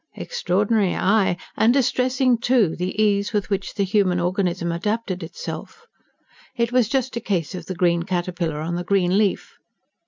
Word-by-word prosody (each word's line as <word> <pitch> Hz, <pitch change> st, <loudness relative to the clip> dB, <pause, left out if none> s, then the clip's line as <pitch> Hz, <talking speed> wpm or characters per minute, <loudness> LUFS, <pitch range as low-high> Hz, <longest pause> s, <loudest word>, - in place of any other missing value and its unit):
Extraordinary, 210 Hz, -, 0 dB
aye, 195 Hz, -3 st, +2 dB, 0.2 s
and 225 Hz, -, +4 dB
distressing, 255 Hz, -1 st, +2 dB
too, 235 Hz, -8 st, +2 dB
the 180 Hz, +4 st, -4 dB
ease 205 Hz, 0 st, +2 dB
with 205 Hz, 0 st, -1 dB
which 195 Hz, -1 st, -2 dB
the 200 Hz, -, +1 dB
human 190 Hz, -2 st, +2 dB
organism 180 Hz, -1 st, -1 dB
adapted 195 Hz, +2 st, -2 dB
itself; 455 Hz, -, -8 dB, 0.7 s
it 235 Hz, -1 st, 0 dB
was 245 Hz, -3 st, +2 dB
just 260 Hz, -1 st, -1 dB
a -, -, -3 dB
case 185 Hz, -6 st, -2 dB
of 175 Hz, -3 st, -7 dB
the 185 Hz, -, -4 dB
green 170 Hz, -1 st, +2 dB
caterpillar 175 Hz, -3 st, -2 dB
on 165 Hz, +2 st, -3 dB
the 175 Hz, +1 st, -2 dB
green 185 Hz, -1 st, +2 dB
leaf. 205 Hz, -3 st, -1 dB
195 Hz, 160 wpm, -22 LUFS, 175-230 Hz, 0.7 s, and